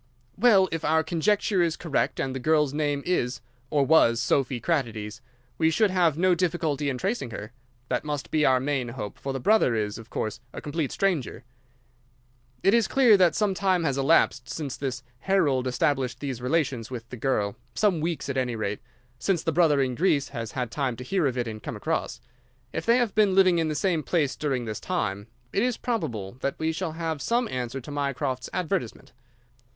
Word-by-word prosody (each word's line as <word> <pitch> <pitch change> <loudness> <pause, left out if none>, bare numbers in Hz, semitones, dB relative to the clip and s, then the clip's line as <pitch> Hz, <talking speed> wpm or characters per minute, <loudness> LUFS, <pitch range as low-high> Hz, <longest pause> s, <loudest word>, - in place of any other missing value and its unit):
"Well, 200 -6 +5
if 165 -1 -3
our 160 +1 +3
conjecture 185 +4 +1
is 170 -2 +1
correct 165 -5 -1
and 130 - -1
the 130 - -4
girl's 150 0 +2
name 145 -2 -1
is 125 -8 0 0.3
or 145 -2 +2
was 125 -7 +5
Sophy 125 +1 +1
Kratides, 115 -7 -2 0.4
we 160 - +4
should 200 +5 +2
have 170 -5 +2
no 185 +1 +4
difficulty 160 -5 0
in 130 - -2
tracing 195 - -2
her. 105 0 -7 0.4
That 125 -1 -1
must 145 -2 -4
be 155 -1 +2
our 130 -2 +4
main 135 -2 -1
hope, 110 -4 -7
for 135 - -4
the 135 - -3
brother 205 - +3
is, 105 -1 -2
of 115 +1 -12
course, 110 -1 -3
a - - -6
complete 150 -1 -3
stranger. 175 - -1 1.2
It 195 - +4
is 230 -4 +4
clear 250 -5 +5
that 180 -3 +4
some 210 -2 +1
time 185 -2 +1
has 140 -4 0
elapsed 140 +5 +2
since 145 -5 -4
this 130 -2 -4 0.2
Harold 145 -10 +1
established 130 0 0
these 135 -4 -4
relations 130 -4 0
with 120 -3 -7
the 125 - -7
girl—some 135 - 0
weeks, 165 -4 -2
at 140 - -2
any 125 -2 0
rate—since 125 - -4
the 165 - 0
brother 155 -4 +3
in 130 -1 -1
Greece 150 -2 +1
has 115 -5 -6
had 125 -3 -3
time 135 -4 -1
to 125 - -8
hear 175 +3 +1
of 130 -1 -2
it 120 -1 -1
and 110 -1 -6
come - - -5
across. - - -2 0.5
If - - -4
they 235 +1 +5
have 240 -5 +1
been 205 -3 +3
living 185 -3 +5
in 165 - +1
the 155 - -2
same 165 +1 +1
place 150 -3 0
during 135 -5 -2
this 110 -1 -4
time, 105 - -2 0.3
it 200 - +2
is 245 0 +1
probable 125 - -3
that 140 - -2
we 160 0 0
shall 165 0 -3
have 160 -2 -3
some 235 - +1
answer 125 +1 -3
to 135 - -9
Mycroft's 135 -3 -2
advertisement." 180 - -3
145 Hz, 195 wpm, -26 LUFS, 125-175 Hz, 1.2 s, Well